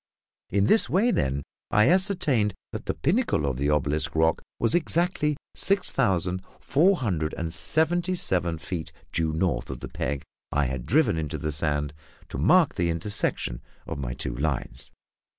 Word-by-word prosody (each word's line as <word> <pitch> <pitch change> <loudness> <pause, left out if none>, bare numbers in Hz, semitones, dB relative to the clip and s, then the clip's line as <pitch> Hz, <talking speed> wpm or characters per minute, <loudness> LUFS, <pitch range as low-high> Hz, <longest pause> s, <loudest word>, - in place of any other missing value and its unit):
In 100 +1 +2
this 220 - +4
way, 220 +7 +3
then, 70 - 0 0.3
I 105 0 +4
ascertained 160 - +3 0.2
that - - -7
the - - -1
pinnacle 175 - +1
of 65 -3 -1
the 70 +2 0
obelisk 75 0 0
rock 80 0 +2 0.2
was 115 - +1
exactly 170 -3 +1 0.2
six 195 -1 +2
thousand 95 -7 +1 0.2
four 175 +8 +3
hundred 85 - -2
and 85 0 -3
seventy 175 - +2
seven 90 - +1
feet 80 +2 -5 0.2
due 80 -1 +1
north 85 +3 -1
of - - -6
the - - -5
peg 70 +1 -3 0.3
I 75 0 +1
had 65 -1 -4
driven 145 - +3
into 75 -2 -3
the 75 - -3
sand 75 -1 -1 0.4
to - - -5
mark 160 - +4
the 85 -1 0
intersection 85 - -1 0.2
of - - -5
my 60 -2 -4
two - - -3
lines. 70 -3 -3
85 Hz, 165 wpm, -26 LUFS, -, 0.4 s, this